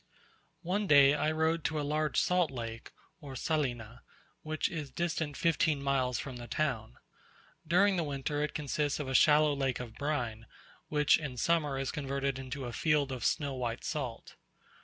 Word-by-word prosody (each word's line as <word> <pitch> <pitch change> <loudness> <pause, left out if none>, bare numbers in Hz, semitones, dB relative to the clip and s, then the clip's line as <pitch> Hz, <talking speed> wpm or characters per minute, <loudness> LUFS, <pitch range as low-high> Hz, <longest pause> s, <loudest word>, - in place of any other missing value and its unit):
One 200 +4 -1
day 140 -2 +7
I 150 +1 +1
rode 160 +1 +1
to 155 0 0
a - - -1
large 150 0 +1
salt 180 -3 +2
lake, 115 -3 -7 0.3
or 140 -5 -9
Salina, 125 -6 -2 0.4
which 155 0 -1
is 155 -4 -5
distant 160 0 -2
fifteen 160 -3 +2
miles 135 -3 0
from 130 -1 -6
the 120 0 -8
town. 115 - -2 0.7
During 190 +4 +4
the 170 - +1
winter 145 0 -2
it 150 - -2
consists 145 0 -1
of 145 - -3
a 130 - -3
shallow 150 +2 +5
lake 135 -2 -1
of 120 -2 -7
brine, 120 -6 -3 0.4
which 150 -1 +3
in 140 -5 -6
summer 150 -1 +1
is 135 0 -2
converted 140 -2 -2
into 130 0 -5
a 120 - -5
field 150 -2 +1
of 130 -2 -5
snow 140 -2 0
white 120 -2 -3
salt. 130 -7 -5
145 Hz, 170 wpm, -31 LUFS, 130-155 Hz, 0.7 s, day